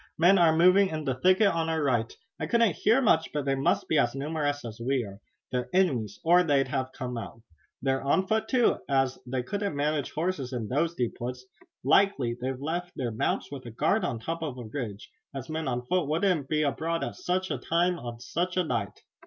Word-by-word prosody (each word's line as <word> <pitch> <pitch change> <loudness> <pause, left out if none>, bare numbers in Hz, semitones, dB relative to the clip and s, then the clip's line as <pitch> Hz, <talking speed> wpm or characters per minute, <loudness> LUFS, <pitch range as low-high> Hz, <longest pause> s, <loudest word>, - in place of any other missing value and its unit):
"Men 180 +4 +5
are 160 -2 +5
moving 185 +3 +6
in 155 -1 -4
the 135 - +1
thicket 185 +10 +4
on 165 -2 -1
our 160 -1 0
right. 120 -5 +1 0.3
I - - -2
couldn't 230 -5 +3
hear 230 +6 +3
much, 160 -8 +3
but 150 -2 -2
they 135 - +1
must 135 0 +1
be 155 - +3
as 120 +2 +1
numerous 145 -1 -2
as 115 0 -8
we 130 0 +1
are. 100 -1 -10 0.3
They're 125 -1 -2
enemies 125 - +1
or 175 +2 +6
they'd 140 -6 +2
have 130 0 -2
come 125 -3 -5
out. 115 0 -9 0.4
They're 135 -1 +1
on 140 +8 +2
foot, 220 +3 0
too, 250 -3 +3
as 135 -2 +1
they 125 0 -2
couldn't 200 +3 -3
manage 145 0 0
horses 155 -6 -2
in 115 -4 -3
those 165 +6 0
deep 120 -5 -2
woods. 125 +1 -5 0.4
Likely 140 -5 +3
they've 130 0 -3
left 175 +5 -3
their 120 -3 -2
mounts 110 - -1
with 140 -2 -7
a - - -5
guard 115 - +1
on 115 - -1
top 165 +9 -4
of 145 -6 -4
a 120 - -7
ridge, 110 -3 -6 0.2
as 130 +1 -6
men 160 -1 -3
on 125 -1 -2
foot 180 +2 0
wouldn't 160 -2 +1
be 155 -1 +1
abroad 165 +3 -1
at - - -3
such 185 +1 -2
a - - -2
time 175 +1 +1
on 120 -1 -7
such 175 +8 -2
a 185 - +3
night." 160 - -3
145 Hz, 220 wpm, -28 LUFS, 125-175 Hz, 0.4 s, moving